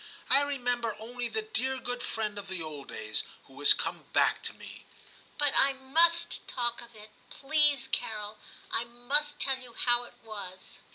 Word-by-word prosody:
I 275 +2 +7
remem 245 -4 -1
ber 230 -2 -2
only 240 +3 -5
the 440 - -2
dear 265 - +1
good 245 -1 -4
friend 210 -3 -2
of 200 - -8
the 185 -1 -2
old 155 -4 -6
days, 110 0 -1 0.2
who 135 +1 -14
is 145 - +7
come - - -3
back - - +3
to - - -3
me.' - - -12 0.3
* - - -27
But 290 -1 +2
I 275 0 +4
must 330 +6 +3
talk 240 -1 -1
of 235 -1 -14
it, 215 0 -13 0.2
please, 290 -2 +3
Carol; 210 -4 -3 0.3
I 230 - +1
must 275 +5 +1
tell 270 -1 +2
you 250 -2 -12
how 240 0 +2
it 240 - -15
was. 200 -4 -7
245 Hz, 185 wpm, -29 LUFS, 215-275 Hz, 0.3 s, I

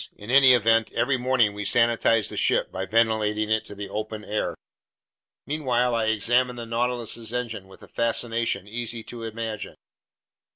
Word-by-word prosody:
In 105 +3 -7
any 135 -1 +7
event, 115 -1 +2
every 130 +1 +1
morning 125 -4 +2
we 105 0 -5
sanitize 115 0 +2
the - - -6
ship - - +1
by 95 +1 -4
ventilating 110 -1 +1
it 110 0 0
in 105 - -10
the 100 - -5
open 110 0 -5
air." 105 - -2 0.9
Meanwhile 125 -5 0
I 115 -1 +1
examined 120 +3 +1
the 120 - -5
Nautilus's 115 -1 -2
engine 115 -5 -4
with 95 - -16
a - - -12
fascination 115 -3 -1
easy 115 +1 -5
to 120 +1 -9
imagine. 110 -1 -5
115 Hz, 160 wpm, -25 LUFS, 110-120 Hz, 0.9 s, any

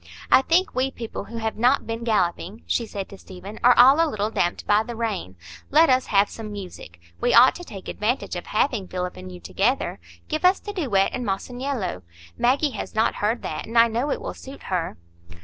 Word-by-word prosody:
"I - - +7
think 360 +8 +1
we 260 +1 0
people 235 -4 -7
who 230 - -8
have 220 -1 -3
not 250 +5 +3
been 230 +1 -4
galloping," 210 -1 -1
she 235 - -1
said 200 -2 -5
to 195 - -12
Stephen, 190 +3 -10
"are 245 0 +6
all 270 +6 +7
a 325 - 0
little 215 -3 -2
damped 175 -5 -1
by 205 +1 +4
the 235 +2 -6
rain. 210 - -3 0.3
Let 315 +1 +5
us 255 0 +2
have 200 0 +3
some 215 0 -8
music. 180 - -9 0.2
We 245 - +3
ought 245 +3 +8
to 355 - -9
take 200 - -10
advantage 220 -1 -2
of 175 - -6
having 215 -3 0
Philip 180 0 -4
and 90 0 -9
you 90 - -10
together. 200 - -1 0.3
Give 310 +2 -3
us 365 +1 +5
the 410 - -7
duet 235 - +1
in 250 - -3
'Masaniello'; 235 - -3 0.3
Maggie 275 +4 +2
has - - -7
not 220 +1 +2
heard 220 +3 0
that, - - -5
and 230 +1 -3
I 230 0 +7
know 240 +6 -1
it - - -1
will - - -5
suit 270 +1 -11
her." 170 -3 -2
225 Hz, 215 wpm, -24 LUFS, 195-260 Hz, 0.3 s, ought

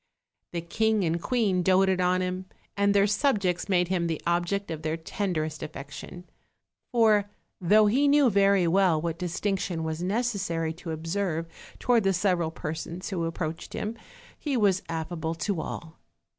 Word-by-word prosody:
The 170 - -3
king 220 +4 +1
and 170 0 0
queen 210 -7 +1
doted 190 +1 +3
OIL 180 0 +2
him, 185 0 -3 0.3
and 200 0 +3
their 200 0 +5
subjects 205 -5 +1
made 180 -2 +2
him 175 -2 +1
the 160 -2 -2
object 175 +3 0
of 155 -1 -4
their 155 +1 -2
tenderest 160 -3 -3
affection; 155 +4 -8 0.6
for, 215 -4 +4 0.3
though 210 +4 +5
he 260 +8 +3
knew 285 -3 +5
very 195 -2 +4
well 180 -2 +3
what 165 +1 -3
distinc 190 +3 -1
tion 170 -3 -3
was 160 +1 -3
necessary 190 -6 -1
to 170 +1 -9
observe 165 +1 -2 0.3
toward 240 -3 +2
the 195 0 +3
several 180 -3 +1
persons 160 +3 -5
who 170 -3 -1
approached 165 -1 -4
him, 215 +2 -3 0.4
he 285 -4 -1
was 195 -4 +3
affable 160 0 -3
to 165 +1 -2
all. 165 0 -7
180 Hz, 160 wpm, -27 LUFS, 165-200 Hz, 0.6 s, their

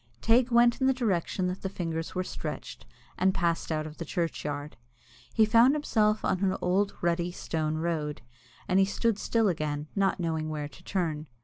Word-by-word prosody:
Teig 235 - +3
went 240 +1 +4
in 260 - +4
the 265 - +3
direction 190 -6 0
that 180 +1 -3
the 190 - -3
fingers 165 -3 -4
were 185 - 0
stretched, - - -6 0.3
and 190 0 +3
passed 170 -3 0
out 155 -1 -1
of 155 0 -9
the - - -2
churchyard. 150 -3 -3 0.6
He 220 - +4
found 230 +6 +5
himself 215 -7 +1
on 185 - 0
an 190 -1 +1
old 195 +3 +1
rutty, 170 0 0
stony 155 -3 -2
road, 155 -3 -2 0.4
and 185 +1 +3
he 195 - +5
stood 210 +2 0
still 225 -2 +2
again, 150 -4 -2
not 195 -1 +1
knowing 160 -2 -1
where 150 -1 -3
to - - -16
turn. 160 -5 -2
180 Hz, 185 wpm, -28 LUFS, 160-210 Hz, 0.6 s, found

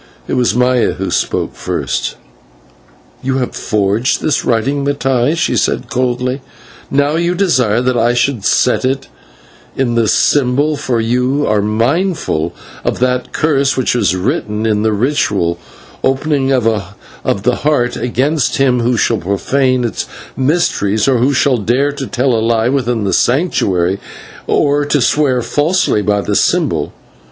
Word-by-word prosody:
It - - -3
was 125 -2 +1
Maya 125 0 +2
who - - -4
spoke - - -1
first. 65 -1 -3 1.1
"You 130 0 -1
have 125 -2 -3
forged 105 +3 0
this 150 - 0
writing, 135 +5 0
Mattai," 140 +1 0
she - - 0
said - - -1
coldly, 125 +1 -1 0.5
"and 135 - -2
now 145 +2 +1
you 170 +1 0
desire 125 - +2
that 125 0 0
I 120 +1 +2
should 120 -3 0
set 125 +5 +2
it 135 +1 -2 0.7
in 130 -3 0
the 115 -1 +2
symbol, 145 +6 +2
for 125 -4 -1
you 125 +5 0
are 105 -1 +1
mindful 115 - 0 0.3
of - - -1
that 125 0 -1
curse 140 -4 +1
which 130 -1 +1
is 105 -7 +1
written 105 - -2
in 105 -2 +1
the 110 0 +1
ritual 105 - 0 0.4
Opening 135 0 +1
of 105 -5 -2
the 125 +2 +2
Heart 145 -5 0
against 135 +4 0
him 130 -2 +2
who 120 +1 +1
shall 115 +1 +1
profane 130 +7 0
its 120 - -3 0.3
mysteries 130 - 0
and 130 +3 +3
token, 120 - +1
or - - +3
who 140 - +1
should 120 -5 +1
are 140 +4 +2
to 140 -2 -6
tell 130 +1 0
a 115 - +1
lie 115 +1 +1
within 125 -4 0
the 95 -2 0
Sanctuary, 100 - +1 0.5
or 145 0 +2
to 145 +1 +1
swear 130 -1 +1
falsely 145 - +1
by 105 0 +1
the - - -2
symbol. - - +1
125 Hz, 155 wpm, -15 LUFS, 110-140 Hz, 1.1 s, and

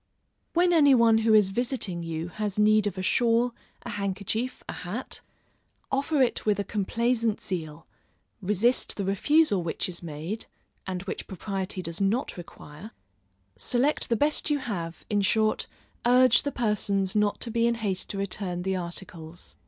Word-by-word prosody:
When 350 +1 +3
any 285 -5 +6
one 230 -2 +5
who 220 0 +4
is 210 -3 +5
visiting 225 -5 -2
you 165 0 -4
has 210 +1 -3
need 210 0 +4
of 195 - -4
a 185 - -3
shawl, 235 +3 +2 0.3
a - - -6
handkerchief, 205 +5 -3
a - - -4
hat, 205 +9 -5 0.7
offer 275 +1 +2
it 245 - 0
with 210 -1 +1
a - - +1
complaisant 225 +3 0
zeal, 165 -4 -5 0.6
resist 210 +6 +2
the 200 - -2
refusal 205 - +3
which 165 -1 -2
is 175 -2 -5
made 170 +6 -5 0.4
(and 185 -1 -3
which 190 - -5
propriety 190 0 -4
does 170 +2 -5
not 215 +7 0
require) 175 +2 -11 0.7
select 270 +4 +1
the 230 - +3
best 295 +6 +1
you 295 - +2
have, 180 -11 -5
in 205 -1 +1
short, 215 +2 +1 0.4
urge 250 0 +5
the 285 - -3
persons 200 -5 0
not 210 -1 +2
to 235 - -2
be 235 +1 +2
in 235 - +1
haste 200 -5 -2
to 200 - -4
return 185 -2 -3
the 190 0 0
articles. 170 -1 -6
210 Hz, 160 wpm, -27 LUFS, 185-235 Hz, 0.7 s, any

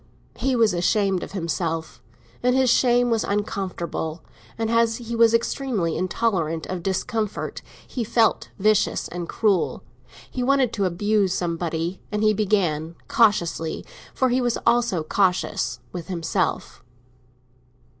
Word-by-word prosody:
He 265 -1 +1
was 225 -5 +3
ashamed 185 +2 +1
of - - -7
himself, 165 -3 -3 0.4
and 250 +1 +2
his 260 -2 +4
shame 245 -1 +3
was 225 -1 +2
uncomfortable; 185 -5 -3 0.3
and 225 0 -1
as 230 -1 +3
he 235 -1 -5
was 230 -1 +5
extremely 230 - 0
intolerant 180 -5 -1
of 185 -2 -4
discomfort, 205 +3 -2 0.3
he 245 - -3
felt 225 0 +2
vicious 210 +1 +2
and 175 -1 -5
cruel. 205 -5 +1 0.5
He 255 - -3
wanted 260 -2 +2
to 200 -3 0
abuse 195 +1 +1
somebody, 170 0 -2
and 210 0 -1
he 215 0 +5
began, 180 -7 0
cautiously—for 205 +2 0
he 250 +1 +2
was 240 -1 +1
always 235 0 +3 0.2
cautious—with 180 -2 -1
himself. 170 -4 -2
205 Hz, 125 wpm, -23 LUFS, 175-230 Hz, 0.5 s, was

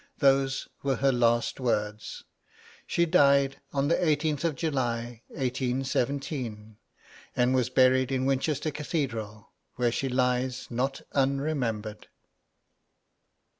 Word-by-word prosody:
Those 135 -2 +2
were 135 -1 0
her 135 +2 +2
last 120 -1 +1
words. 105 -4 -2 0.6
She 170 - +2
died 140 -5 +3
on 140 0 0
the 165 - +3
18th 155 -3 +1
of 165 -3 0
July, 120 -6 -2
1817, 130 -3 -2 0.6
and 125 +1 +2
was 125 -2 +1
buried 130 0 +4
in 130 -1 0
Winchester 140 +3 0
Cathedral, 115 - -4 0.2
where 120 -1 +1
she 135 +3 -2
lies 125 0 0
not 130 +3 -1
unremembered. 135 -6 -1
130 Hz, 105 wpm, -28 LUFS, 120-140 Hz, 0.6 s, buried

